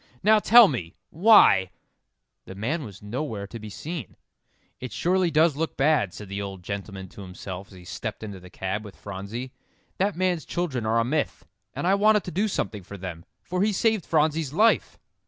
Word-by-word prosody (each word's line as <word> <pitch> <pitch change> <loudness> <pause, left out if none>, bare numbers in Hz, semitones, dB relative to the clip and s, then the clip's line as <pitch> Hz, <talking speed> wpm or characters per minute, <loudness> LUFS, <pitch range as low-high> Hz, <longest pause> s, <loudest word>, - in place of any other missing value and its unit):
"Now 215 +2 +6
tell 235 +1 +8
me 95 - -4 0.2
why 165 - +6 0.4
" - - -55
The 95 - -8
man 140 - -2
was 105 -4 -10
nowhere 110 -1 -4
to 115 +3 -9
be 110 0 -8
seen. 155 - -6 0.6
"It 130 -2 -6
surely 180 - +1
does 160 -1 +3
look 160 +2 -3
bad," 135 - +3
said 105 +3 -9
the 100 +1 -4
old 95 -2 -7
gentleman 100 0 -6
to 100 - -12
himself 95 0 -8
as - - -18
he 90 -1 -13
stepped 105 +3 -6
into 100 -3 -7
the 90 0 -13
cab 95 +4 -3
with 105 -3 -11
Phronsie; 105 +6 -7 0.5
"that 195 +1 +1
man's 180 -2 0
children 135 -11 -2
are 115 +1 +2
a 115 - +1
myth. 150 +4 -2 0.3
And - - -3
I 190 - +4
wanted 210 +1 +4
to 180 - -6
do 200 +7 +1
something 105 - -3
for 100 +3 -10
them, 90 -3 -7 0.2
for 180 +1 -2
he 210 +2 +3
saved 220 -1 +1
Phronsie's 155 -2 +1
life!" 220 +7 +3
120 Hz, 195 wpm, -25 LUFS, -, 0.6 s, tell